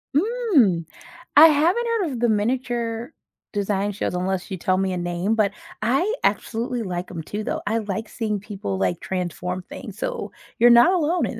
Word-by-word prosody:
Mm. 310 - +3 0.5
I 315 +3 +11
haven't 335 +10 +3
heard 345 -6 -1
of 245 - -4
the 240 -1 +2
miniature 235 +2 -1 0.4
design 205 0 -1
shows, 200 - -3
unless 185 0 -2
you 190 - -3
tell 185 +2 +1
me 190 -1 0
a - - -2
name, 175 +5 -1
but, 205 -2 +2 0.3
I 270 - +2
absolutely 240 +1 -1
like 180 -1 -4
'em 165 -3 -5
too 210 +6 -5
though. - - -3
I 225 +2 +1
like 215 +1 -4
seeing 215 -3 -2
people, 190 - -5
like, 95 -2 0
transform 180 0 -3
things, - - -9
so, - - -4 0.3
you're 240 +1 +7
not 240 +10 +7
alone 345 -1 +1
in - - -5
215 Hz, 180 wpm, -23 LUFS, 185-260 Hz, 0.5 s, I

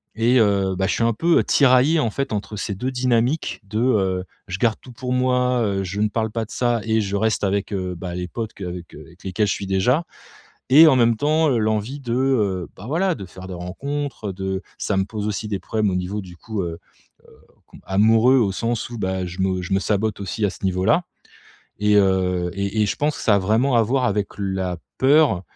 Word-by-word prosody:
Et 120 +3 +3
heu, 100 -3 +2
bah, 95 +1 0
je - - 0
suis - - 0
un 115 0 +2
peu 170 +9 +3
tiraillé 140 +4 +4
en 120 - +1
fait 135 -1 -3
entre 105 0 -4
ces 100 - -3
2 125 +7 -3
dynamiques 125 +3 0
de, 105 +2 -3
heu, 95 -7 +1 0.2
je 90 -1 -4
garde 115 0 +2
tout 130 - -13
pour 125 +1 -4
moi, 125 -1 +2
heu, 100 -2 -1
je 100 +2 -3
ne 105 - +2
parle 110 0 -2
pas 115 0 -2
de - - -23
ça 120 -2 0
et 110 0 +1
je 100 -1 -3
reste 110 +1 0
avec, 100 +1 0
heu, 95 -2 -2
bah, 90 0 -6
les 90 0 -4
potes 110 +5 -5
qu'avec 90 -3 -7
qu'avec 80 +4 -14
lesquels 95 +2 0
je - - +1
suis 100 - -5
déjà. 125 - +2 0.7
Et 155 +5 +9
en 135 - +4
même 115 -2 +3
temps, 155 +5 +2
heu, 125 - +2
l'envie 110 +5 -1
de, 120 -3 -4
heu, 110 -9 +1
bah, 100 - -10
voilà 175 +5 +1
de 95 - -7
faire 95 +1 -11
des 95 - -6
rencontres 110 +6 -4
de 95 0 -3 0.2
ça 100 - -1
me 95 - +2
pose 105 +1 -5
aussi 105 +1 -3
des 100 -2 -3
problèmes 105 +1 -1
au - - -2
niveau 90 +3 -3
du 90 -2 -12
coup 110 -1 -4
heu, 85 -1 -5 0.7
heu, - - -28
com - - -16
amoureux 110 +6 +4
au 105 -6 +2
sens 115 +3 -2
où, 120 - -6
bah, 95 -2 -2
je 90 +1 -8
me 95 -1 0
je 90 - -5
me - - +3
sabote 105 0 -1
aussi 100 +2 -3
à - - -1
ce - - -13
niveau-là 95 - +2 0.8
et 105 0 +3
heu, 90 -3 +2
et 100 +2 -1
et 105 - +2
je - - -1
pense 150 +1 0
que - - -7
ça 110 - +4
a - - +3
vraiment 115 +7 +2
à 115 - +5
voir 125 +4 0
avec 105 -3 0
la 95 -2 -2 0.2
peur, 135 - +4
105 Hz, 230 wpm, -22 LUFS, 95-125 Hz, 0.8 s, Et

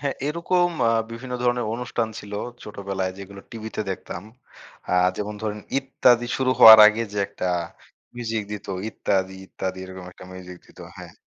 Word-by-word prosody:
হ্যাঁ, 140 -1 -2
এরকম 175 +3 +1 0.2
আ - - +2 0.2
বিভিন্ন 125 +2 -7
ধরনের 120 -1 +1
অনুষ্ঠান 120 -1 -2
ছিল। 105 0 -10 0.3
ছোটবেলায় 100 -2 -4
যেগুলো 100 0 -10
টিভিতে 110 -1 -6
দেখতাম। 90 -1 -6 0.7
আ - - +3 0.2
যেমন 105 0 -4
ধরেন 105 -1 -3 0.2
"ইত্যাদি" 125 -3 +2
শুরু 130 -1 +1
হওয়ার 110 -1 +11
আগে 110 +2 +2
যে 105 - -3
একটা 90 - -4 0.7
মিউজিক 115 -2 -3
দিত, 105 - -7 0.2
"ইত্যাদি, 95 -3 -1
ইত্যাদি," 95 0 -5
এরকম 95 0 -10
একটা - - -14
মিউজিক 90 -1 -10
দিত, - - -21 0.2
হ্যাঁ, - - -11
110 Hz, 155 wpm, -23 LUFS, 95-120 Hz, 0.7 s, হওয়ার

